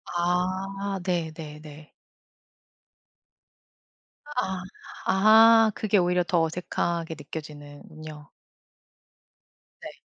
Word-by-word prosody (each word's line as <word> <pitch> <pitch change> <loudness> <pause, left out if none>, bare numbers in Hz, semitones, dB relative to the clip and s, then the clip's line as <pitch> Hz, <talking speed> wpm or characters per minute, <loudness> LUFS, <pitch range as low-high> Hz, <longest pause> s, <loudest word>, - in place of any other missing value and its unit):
아. 185 +3 -1
네 170 -3 -1
네 150 -2 -9
네. 150 0 -13 2.5
아, 190 -6 -2 0.4
아 220 +2 +6
그게 210 -1 +1
오히려 180 0 +2
더 175 -1 +1
어색하게 165 0 -3
느껴지는군요. 150 0 -10 1.5
네. - - -6
175 Hz, 135 characters per minute, -26 LUFS, 155-195 Hz, 2.5 s, 아